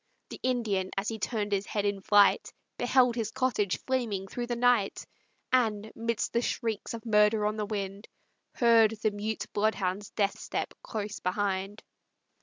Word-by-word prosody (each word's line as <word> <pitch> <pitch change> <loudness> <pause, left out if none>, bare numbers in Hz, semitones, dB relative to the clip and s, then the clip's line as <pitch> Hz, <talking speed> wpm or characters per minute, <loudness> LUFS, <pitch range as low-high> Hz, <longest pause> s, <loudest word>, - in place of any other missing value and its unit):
The - - -8
Indian, 220 -7 0
as 195 +2 0
he 225 -1 -5
turn'd 210 -3 -2
his 200 0 0
head 205 -1 -1
in 200 -1 -1
flight, 205 0 +4 0.2
Beheld 250 0 +3
his 225 -3 -1
cottage 230 -6 0
flaming 235 -7 -1
through 240 +4 -4
the 240 - -1
night, 235 -4 +2 0.5
And, 220 -4 +1
midst 230 0 -2
the 235 - +2
shrieks 230 -2 -2
of 230 - -10
murder 210 -1 +4
on 210 0 0
the 210 -1 -3
wind, 200 -1 -4 0.5
Heard 230 -2 +5
the 215 - +3
mute 210 +2 -3
bloodhound's 205 -2 0
death 200 -2 -1
step - - -3
close 210 -2 -5
behind. 195 +2 -2
215 Hz, 160 wpm, -29 LUFS, 205-230 Hz, 0.5 s, Heard